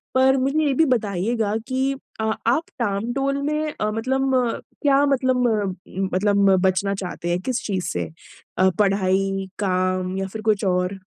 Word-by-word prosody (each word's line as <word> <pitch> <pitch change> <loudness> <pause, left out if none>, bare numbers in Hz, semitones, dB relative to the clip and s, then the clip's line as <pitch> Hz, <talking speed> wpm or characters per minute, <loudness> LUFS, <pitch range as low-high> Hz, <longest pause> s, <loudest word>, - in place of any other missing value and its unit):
पर 265 +1 +5
मुझे 275 +4 +1
ये 280 - +2
भी 320 +5 +4
बताइएगा 210 0 -1
कि 265 +1 0 0.3
अ, 220 - -1 0.2
आप 255 +8 +3 0.2
टाल-मटोल 240 +6 -1
में 300 +1 -1
अ, 215 - +1
मतलब 265 +4 0
अ, 245 -2 +1 0.2
क्या 285 -1 +4
मतलब 255 -2 +2
अ, 195 -5 -3 0.2
मतलब 200 0 +4
बचना 190 +1 +1
चाहते 180 -2 -5
हैं, 175 +1 +1
किस 255 +3 -2
चीज़ 190 -3 -2
से? 85 -2 -3 0.7
पढ़ाई, 195 -1 +1
काम 185 -1 0
या 195 0 -2
फिर 215 +3 -7
कुछ 215 -2 +1
और? 180 +1 0
210 Hz, 155 wpm, -22 LUFS, 190-260 Hz, 0.7 s, पर